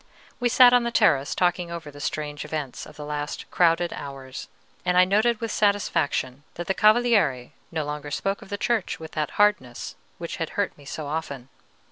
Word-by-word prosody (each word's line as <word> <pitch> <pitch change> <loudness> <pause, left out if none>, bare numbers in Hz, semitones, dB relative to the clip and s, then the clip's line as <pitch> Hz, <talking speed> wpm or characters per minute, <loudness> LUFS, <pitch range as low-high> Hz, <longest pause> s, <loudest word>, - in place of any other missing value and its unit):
We 245 -1 +2
sat 245 +1 +7
on 245 - +6
the 235 - 0
terrace 140 -11 +3
talking 180 -1 +1
over 170 -3 -7
the 145 - -12
strange 150 0 -3
events 150 -5 -5
of - - -14
the 150 - -8
last 150 +1 -4
crowded 170 0 +3
hours, 135 -1 -8 0.4
and 180 0 +1
I 180 - +7
noted 215 +4 +2
with 230 -2 -3
satisfaction 155 -10 0
that 175 - -5
the 190 - 0
Cavaliere 210 - +3 0.2
no 160 -3 -2
longer 150 0 -5
spoke 195 +7 -2
of - - -13
the 205 - -3
Church 225 -2 -1
with 160 -1 -9
that 150 -1 -3
hardness, 205 -13 +1 0.2
which 170 -1 -6
had 165 - -4
hurt 205 -1 0
me 145 - -17
so 150 +2 -5
often. 140 -4 -5
165 Hz, 190 wpm, -25 LUFS, 145-205 Hz, 0.4 s, sat